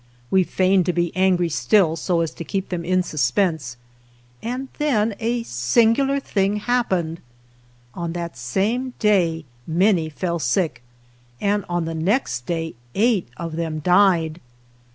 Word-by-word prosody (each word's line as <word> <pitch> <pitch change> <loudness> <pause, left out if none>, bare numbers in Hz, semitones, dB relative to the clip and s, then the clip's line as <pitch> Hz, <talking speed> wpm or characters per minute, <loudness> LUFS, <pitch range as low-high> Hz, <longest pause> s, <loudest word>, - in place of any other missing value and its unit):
We 190 -1 +5
feigned 185 0 +2
to 180 - +2
be 175 -1 -1
angry 185 -2 +2
still, 170 0 +3
so 170 +1 0
as 165 - -1
to - - -8
keep 195 +3 -3
them 175 -2 -3
in 185 +1 +1
suspense, 145 -2 0 0.6
and 250 +3 -4
then 230 -8 +1
a 235 +1 -1
singular 230 - +2
thing 200 -6 0
happened. 195 -8 -1 0.7
On 170 +2 -4
that 170 -1 -5
same 215 - -1
day 175 -7 +2 0.2
many 170 -1 +2
fell 170 +2 -3
sick, 150 +3 0 0.6
and 205 0 +1
on 175 -1 -1
the 165 - -3
next 160 - -1
day 165 -1 -2 0.2
eight 220 - +2
of 165 -1 -5
them 165 -2 -2
died! 175 -1 +3
180 Hz, 140 wpm, -22 LUFS, 165-210 Hz, 0.7 s, We